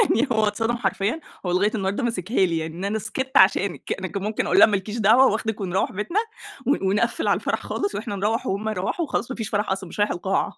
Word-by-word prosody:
يعني 255 +5 +2
هو 220 -2 +3
اتصدم 225 +3 0
حرفيًا 205 +5 -1 0.3
هو 180 - 0
لغاية 200 +4 +2
النهارده 200 +4 -1
ماسكها 210 -3 +1
لي 165 -2 -1
يعني 160 0 -4
إن 185 +3 -4
أنا 215 +2 -1
سكت 265 +6 -2
عشانِك، 190 -1 +3
أنا 185 - -3
كان 200 +2 -5
ممكن 215 +1 -1
أقول - - +3
لها - - +10
ما 205 - +1
لكيش 210 +4 -4
دعوة 225 +5 +6
وأخدِك 220 -2 -2
ونروّح 190 0 0
بيتنا 210 - -1 0.5
ون 280 - +2
ونقفل 210 +4 0
على - - +4
الفرح - - -1
خالص 405 0 -3
وإحنا 205 -5 -4
نروّح 210 +4 -1
وهُم 205 +3 -1
يروّحوا 215 - -2
وخلاص 260 -2 -2
ما - - -5
فيش 220 -3 -4
فرح 205 -1 -1
أصلًا 190 -1 -3
مش - - -10
رايح 205 - +2
القاعة 190 +2 -1
210 Hz, 240 wpm, -23 LUFS, 190-230 Hz, 0.5 s, لها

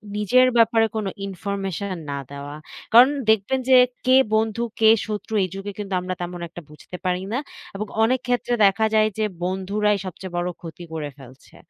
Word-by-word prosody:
নিজের 250 +5 +4
ব্যাপারে 225 0 +4
কোনো 215 -3 -1 0.2
ইনফরমেশন 195 0 -4 0.2
না 140 - -3
দেওয়া। 145 +1 -7 0.4
কারণ, 245 +3 +9 0.2
দেখবেন 220 +5 +2
যে 260 - +7 0.3
কে 255 - +5 0.2
বন্ধু, 220 +1 0 0.2
কে 220 -1 +6 0.2
শত্রু, 215 +1 -5
এই 185 - -2
যুগে 200 +1 -5
কিন্তু 200 -2 -5
আমরা 185 0 -3
তেমন 175 0 -5
একটা 175 +1 -10
বুঝতে 150 +4 -10
পারি 180 0 0
না। 255 - 0 0.4
এবং 210 +1 -4 0.2
অনেক 255 +3 +2
ক্ষেত্রে 245 0 0
দেখা 210 +3 +3
যায় 215 0 +4
যে, 215 - +1 0.2
বন্ধুরাই 200 +3 0
সবচেয়ে 185 0 -7
বড় 175 +1 -1
ক্ষতি 170 +1 -9
করে 150 -2 -4
ফেলছে। 130 +1 -16
200 Hz, 175 wpm, -23 LUFS, 180-220 Hz, 0.4 s, কারণ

